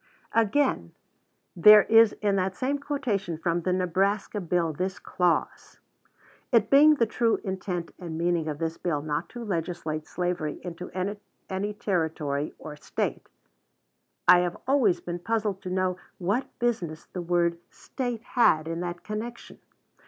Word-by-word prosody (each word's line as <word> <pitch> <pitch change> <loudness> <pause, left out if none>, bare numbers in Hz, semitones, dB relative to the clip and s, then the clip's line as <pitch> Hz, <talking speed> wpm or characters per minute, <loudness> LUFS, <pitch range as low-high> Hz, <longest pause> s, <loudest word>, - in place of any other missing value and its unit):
Again, 225 - +1 0.6
there 210 +4 +9
is 225 -1 +6
in 200 -1 +2
that 190 0 -1
same 275 +2 -1
quotation 240 - -2
from 170 +1 -1
the 185 - -1
Nebraska 190 +3 0
bill 170 -2 0
this 185 +3 -3
clause: 175 +2 -1 0.7
"It 225 -4 +3
being 300 +2 +7
the 235 - +2
true 230 0 +1
intent 185 -3 -4
and 170 -3 -6
meaning 170 -1 0
of 150 -2 -3
this 165 +1 -3
bill 150 -5 -1
not 155 +2 -3
to 240 -1 -7
legislate 165 -5 -3
slavery 175 -4 -2
into 175 0 -7 0.6
any 200 +2 -2
Territory 160 -7 -1
or 150 -1 -9
State." 150 - -4 1.0
I 180 - +9
have 175 -1 -1
always 225 -11 +3
been 175 0 -5
puzzled 210 0 -1
to 185 - -6
know 185 0 0 0.2
what 200 +9 -1
business 180 -10 -2
the 180 - -6
word 170 -1 +1
"State" 245 -4 -5
had 160 - +3
in 165 0 -3
that 175 0 -5
connection. 225 +3 -6
180 Hz, 145 wpm, -27 LUFS, 170-215 Hz, 1.0 s, there